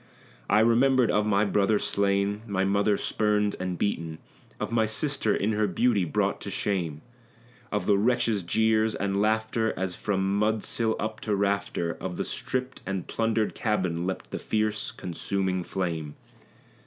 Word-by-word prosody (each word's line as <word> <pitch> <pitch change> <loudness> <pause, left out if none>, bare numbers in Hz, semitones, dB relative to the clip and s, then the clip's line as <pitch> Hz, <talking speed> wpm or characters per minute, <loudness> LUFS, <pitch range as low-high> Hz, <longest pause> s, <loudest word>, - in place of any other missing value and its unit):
I 105 - +5
remembered 120 +1 +4
of 105 0 +2
my 100 0 +3
brother 105 +1 +2
slain, 100 +1 +1
my 95 -2 0
mother 100 +1 +2
spurned 105 -1 +1
and 90 -1 -3
beaten. 85 -5 -2 0.4
Of - - -3
my 115 -1 +2
sister 110 -1 0
in 105 +3 0
her 105 0 +1
beauty 100 0 +2
brought 75 - 0
to - - -5
shame; 85 -7 -2 0.7
Of 105 - -1
the 100 -2 +4
wretches' 115 -2 +2
jeers 110 +4 +2
and 100 0 0
laughter, 110 +1 +1
as 95 -1 -2
from 95 +1 0
mud 110 0 +1
sill 110 -1 0
up 110 0 -3
to 105 -2 -1
rafter 100 -4 0
Of 90 -2 -4
the - - -1
stripped 130 0 -3
and 95 -2 -3
plundered 115 -1 0
cabin 95 -5 -1
leapt 95 - -4
the - - -3
fierce, 110 -1 -1
consuming 95 +1 -2
flame. 85 -6 -3
105 Hz, 155 wpm, -27 LUFS, 95-110 Hz, 0.7 s, I